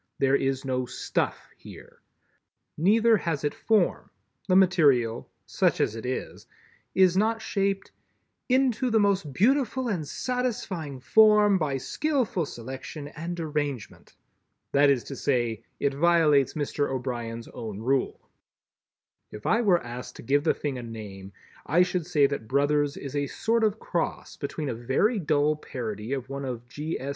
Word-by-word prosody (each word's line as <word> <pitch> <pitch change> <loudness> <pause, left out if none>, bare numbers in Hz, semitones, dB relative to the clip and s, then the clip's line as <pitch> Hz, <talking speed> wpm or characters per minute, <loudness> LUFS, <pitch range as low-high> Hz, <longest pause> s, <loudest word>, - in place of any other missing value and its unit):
There 135 0 +3
is 135 -1 -1
no 130 -1 -1
"stuff" - - -3
here. - - -14 0.7
Neither 220 +6 +4
has 165 -7 -2
it 145 - 0
Form. 220 -2 +1 0.4
The 185 - +3
material—such 145 -11 +2
as 110 - +1
it 115 +2 -6
is—is 180 +7 -2
not 225 +3 +2
shaped 195 -3 -1 0.6
"into 255 -1 +2
the 225 -1 +3
most 195 -7 +1
beautiful 255 - +2
and 170 -8 -2
satisfying 210 - -3
form 210 +2 +5
by 145 -4 -1
skillful 245 - -1
selection 135 +5 -7
and 170 +3 -6
arrangement." 145 -6 -4 0.6
That 140 +1 +5
is 135 -4 +2
to 140 - -7
say, 120 -5 0 0.2
it 140 - +1
violates 155 -2 +3
Mr. 145 -1 -1
O'Brien's 120 -3 -4
own 110 -3 -7
rule. 130 +4 -1 1.0
If 105 0 -10
I 230 - +3
were 185 -6 +3
asked 120 +1 -8
to - - -10
give 145 +4 +2
the 160 - +2
thing 140 -4 -3
a - - -5
name, 105 -4 -8 0.4
I 170 +5 +5
should 180 -2 -2
say 150 -5 +4
that 140 -5 -2
"Brothers" 145 +2 +1
is 140 0 -7
a 145 -1 0
sort 225 - 0
of 215 -1 +2
cross 170 -5 -3
between 145 0 -4
a - - -1
very 135 - +1
dull 150 -2 +1
parody 110 -6 -6
of 130 -2 -4
one 140 +1 -5
of 120 -2 -5
G. 150 +5 -4
S. 135 - -5
145 Hz, 150 wpm, -26 LUFS, 130-190 Hz, 1.0 s, form